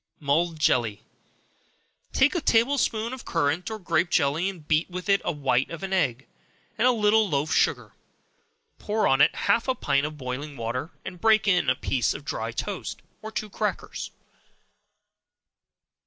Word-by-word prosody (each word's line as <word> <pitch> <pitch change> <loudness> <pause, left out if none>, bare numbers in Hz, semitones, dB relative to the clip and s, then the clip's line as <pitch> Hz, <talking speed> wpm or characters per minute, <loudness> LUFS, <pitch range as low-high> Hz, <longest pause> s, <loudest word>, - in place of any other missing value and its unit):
Mulled 160 +3 +1
Jelly. 120 -8 +1 1.1
Take 265 +2 +3
a 350 - -1
table 260 +2 +3
spoonful 230 0 -1
of 260 - -8
currant 165 +3 0
or 220 - -4
grape 170 -3 0
jelly, 160 +4 +1
and 170 -6 -10
beat 155 +3 +1
with 180 +1 -6
it 200 0 +4
the - - -1
white 135 -4 0
of 165 +2 -7
an 190 0 -3
egg, 135 -8 0 0.5
and 230 +3 +3
a - - +6
little 215 -2 +3
loaf 145 +1 0
sugar; - - +1 0.9
pour 215 +1 0
on 135 +1 +3
it - - +5
half 215 +6 +2
a 260 - +1
pint 140 - +1
of 150 0 -9
boiling 140 +2 -5
water, 120 +6 -3 0.2
and 180 -2 -8
break 220 -1 +4
in 180 -8 +3
a 130 - +3
slice 125 -4 +1
of - - -9
dry - - -3
toast, - - -5 0.2
or 220 - -7
two 215 -1 -3
crackers. 205 - -4
170 Hz, 170 wpm, -26 LUFS, 140-215 Hz, 1.1 s, a